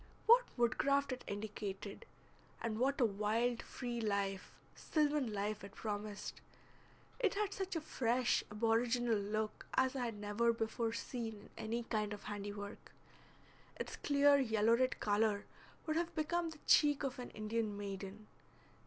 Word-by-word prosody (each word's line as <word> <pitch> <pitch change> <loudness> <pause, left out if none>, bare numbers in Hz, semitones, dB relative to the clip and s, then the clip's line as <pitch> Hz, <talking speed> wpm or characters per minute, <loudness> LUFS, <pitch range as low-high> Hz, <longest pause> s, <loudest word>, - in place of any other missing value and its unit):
What 475 +2 +8 0.2
woodcraft 275 +4 +2
it 255 - -4
indicated, 205 -1 -5 0.5
and 220 -1 -2
what 275 +4 +2
a 245 - +5
wild 225 +3 +1
free 240 -2 -4
life, 200 -3 -1 0.2
sylvan 295 -5 +1
life, 210 0 -2
it 200 +1 -10
promised! 210 -1 -4 0.8
It 430 -6 +2
had 410 -1 0
such 385 -2 -3
a 325 - 0
fresh, 250 -4 +1
aboriginal 230 +2 +2
look 215 +1 -2
as 260 +1 +3
I 255 -2 0
had 230 -2 -3
never 210 +3 +2
before 225 0 -1
seen 230 -1 -4
in 205 - -14 0.2
any 230 +2 -1
kind 215 -2 -1
of 205 - -8
handiwork. 205 0 -6 0.8
Its - - -5
clear 285 0 +5
yellow 225 -3 +4
red 255 +1 +1
color 205 0 +2 0.4
would 315 0 0
have 340 0 -1
become 335 +2 0
the 315 - -10
cheek 290 -1 +5
of 265 -2 -2
an 245 - -5
Indian 215 -1 -2
maiden. 200 +1 -6
230 Hz, 145 wpm, -37 LUFS, 210-265 Hz, 0.8 s, What